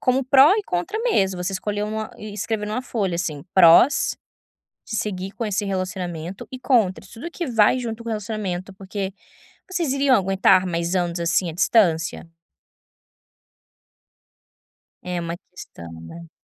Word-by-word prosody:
como 255 +1 +1
pró 275 +7 +6
e 425 - -1
contra 180 - -3
mesmo, 190 - +1
você 195 +2 -2
escolher 205 +2 -3
uma 215 0 -4
e 215 -1 -8
escrever 210 +1 -3
em - - -5
uma 250 - -1
folha, 195 -9 -2
assim: 155 -5 -3
prós 180 - +6 0.7
de 220 - -4
seguir 190 -2 -3
com 230 - -4
esse 205 0 -1
relacionamento, 185 -2 -4
e 255 - -7
contra, 225 -9 +1
tudo 310 +9 -8
que 340 -3 -4
vai 230 +1 +3
junto 230 -1 -5
com 230 - -5
o - - -2
relacionamento, 200 -3 -4
porque 195 0 -5 0.6
vocês 345 -7 -1
iriam 275 -2 +4
aguentar 190 -1 +3
mais 170 +1 -1
anos, 175 -1 -1
assim, 170 +1 +1
a - - -6
distância? 175 -3 +2 2.8
É 180 -1 -3
uma 170 0 -4
questão, 85 - -11
né. 165 - -11
195 Hz, 155 wpm, -22 LUFS, 180-230 Hz, 2.8 s, pró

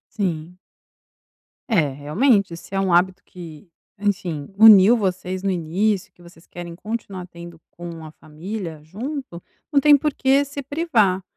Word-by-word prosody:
Sim. 175 -4 -3 1.1
É, 160 -9 +3
realmente 180 - +1
se 180 - -14
é 195 - 0
um 190 -1 0
hábito 180 +2 +2
que, 170 -1 -12 0.3
enfim, 185 -8 -3
uniu 215 +1 +8
vocês 185 -2 -3
no 195 - 0
início, 185 +4 -1
e - - -48
que 175 - -24
vocês 170 -1 -18
querem 175 -1 -9
continuar 195 -2 -6
tendo 170 -1 -12
com 170 -2 -9
a 155 - -10
família 160 +1 -8
junto, 225 - -7 0.3
não 285 - +4
tem 290 +1 +6
porquê 280 -1 +2
se 280 0 -7
privar. 250 - +1
185 Hz, 150 wpm, -21 LUFS, 170-220 Hz, 1.1 s, uniu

